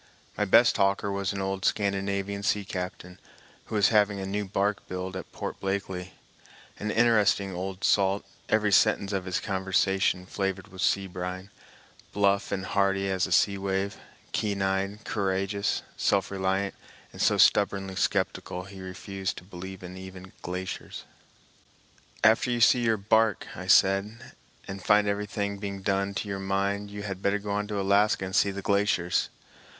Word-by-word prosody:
My 105 - 0
best 115 +5 +6
talker 100 +1 +1
was 100 0 -1
an 100 -1 -4
old 95 0 -3
Scandinavian 100 0 0
sea 100 0 0
captain, 90 -1 -6 0.5
who - - -6
was 100 -2 +4
having 105 -2 +3
a 95 - -4
new 100 +2 -2
bark 100 +1 -1
built 90 0 -5
at 95 - -7
Port - - -6
Blakely,—an 95 +2 -6
interesting 105 -4 +3
old 95 +1 -5
salt, 100 0 +2 0.2
every 105 -1 +2
sentence 100 +1 +3
of 95 -2 -2
his 90 -1 -1
conversation 95 -1 +1
flavored 95 0 -3
with 95 0 -8
sea 100 +1 +2
brine, 90 +1 -6 0.6
bluff 100 0 +2
and 95 -1 -2
hearty 100 -1 +1
as 95 -1 +1
a - - -10
sea 100 -1 +3
wave, 95 0 -1 0.4
keen 100 -2 -1
eyed, 95 +2 -1
courageous, 100 0 -1
self 100 -1 +1
reliant, 95 0 -1 0.4
and - - -6
so - - +3
stubbornly 95 -2 +3
skeptical 90 0 -1
he 95 0 -11
refused 95 +1 -5
to - - -9
believe 95 0 -9
even 95 +1 -9
in 95 - -13
glaciers. 90 +1 -5 1.2
"After 115 +4 +5
you 120 -1 0
see 125 +1 +5
your 115 -2 +2
bark," 110 +1 +2
I - - -7
said, 100 +5 +3 0.4
"and 95 -1 -7
find 105 0 +4
everything 100 0 -2
being 100 -1 -5
done 100 0 0
to 105 - -3
your 100 -1 -3
mind, 100 +1 -1
you 100 0 -7
had 95 -2 -5
better 100 +1 +2
go 105 0 -5
on 105 0 -1
to 105 -1 -3
Alaska 100 0 +2
and 95 +1 -5
see 100 - +4
the 100 0 -5
glaciers." 100 -3 +1
100 Hz, 160 wpm, -27 LUFS, 95-100 Hz, 1.2 s, best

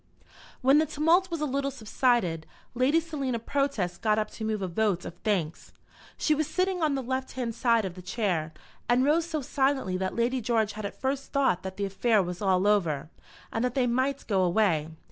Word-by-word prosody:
When 270 +3 +5
the 315 - +2
tumult 325 +5 +2
was 335 -3 -3
a - - +1
little 275 0 -1
subsided, 225 - 0 0.3
Lady 260 +6 +3
Selina 285 -7 -3
Protest 230 -8 -1
got 215 -1 +2
up 215 -1 -1
to - - -8
move 215 -2 -1
a - - -1
vote 190 0 0
of - - -6
thanks. 175 -7 -2 0.4
She 310 - +2
was 305 0 0
sitting 370 +2 0
on 300 -3 +2
the 270 - -2
left 260 +1 -3
hand 245 -3 -3
side 230 -2 +2
of 185 - -4
the 180 - -10
Chair, 180 -5 -1 0.4
and 250 +2 +4
rose 320 +3 +2
so 310 -4 -3
silently 265 -8 0
that 190 0 -2
Lady 245 +2 0
George 220 -2 +1
had 215 -1 -6
at - - -12
first 270 +1 -2
thought 265 -11 +2
that 190 0 -7
the 200 - -1
affair 205 +2 +2
was 175 0 -6
all 190 -1 +2
over, 165 -8 +1 0.4
and 225 - 0
that 250 -1 -1
they 260 -2 +2
might 260 +3 0
go 195 -3 +1
away. 175 -4 +2
235 Hz, 205 wpm, -28 LUFS, 190-275 Hz, 0.4 s, When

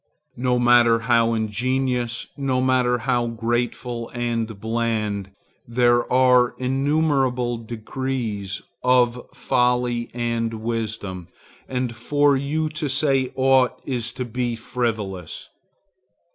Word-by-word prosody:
No 125 0 +1
matter 120 -1 +5
how 115 -1 +3
ingenious, 120 +2 -1
no 135 -3 0
matter 130 -1 +2
how 120 -2 +1
graceful 120 +1 -2
and 115 -3 -2
bland. 110 -3 -1 0.4
There 120 0 +2
are 125 -1 +4
innumerable 135 -2 +1
degrees 115 -3 -4 0.2
of 125 -1 +3
folly 125 -1 +1
and 115 -1 -1
wisdom, 110 -5 -4 0.4
and 125 -2 -2
for 145 +4 +2
you 145 +4 -1
to 155 -1 -3
say 135 -1 +1
aught 130 -1 +3
is 120 -4 -2
to 125 - -4
be 120 0 -2
frivolous. 110 -7 -4
120 Hz, 105 wpm, -23 LUFS, 115-130 Hz, 0.4 s, matter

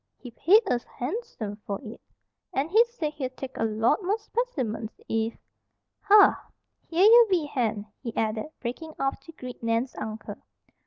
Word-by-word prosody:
"He 245 - -10
paid 390 - +5
us 240 -7 0
harnsome 245 - -5
for 200 -2 -5
it; 225 -1 -9 0.5
and 285 +5 -1
he 445 +4 +7
said 360 -11 -4
he'd 260 -3 -5
take 265 -1 -7
a - - -1
lot 225 - +2
more 395 +4 +1
spec'mens 260 - -3
if 225 +1 -1 0.6
"Har! 410 -1 +6 0.5
Here 345 +4 +3
ye 470 +2 +9
be, 350 -5 +2
Hen," 225 -7 -1 0.2
he 235 - -4
added, 215 +3 -1
breaking 310 +7 -5
off 270 0 -1
to 330 - -13
greet 255 -5 -9
Nan's 230 +2 0
uncle. 220 0 -6
255 Hz, 160 wpm, -27 LUFS, 225-355 Hz, 0.6 s, ye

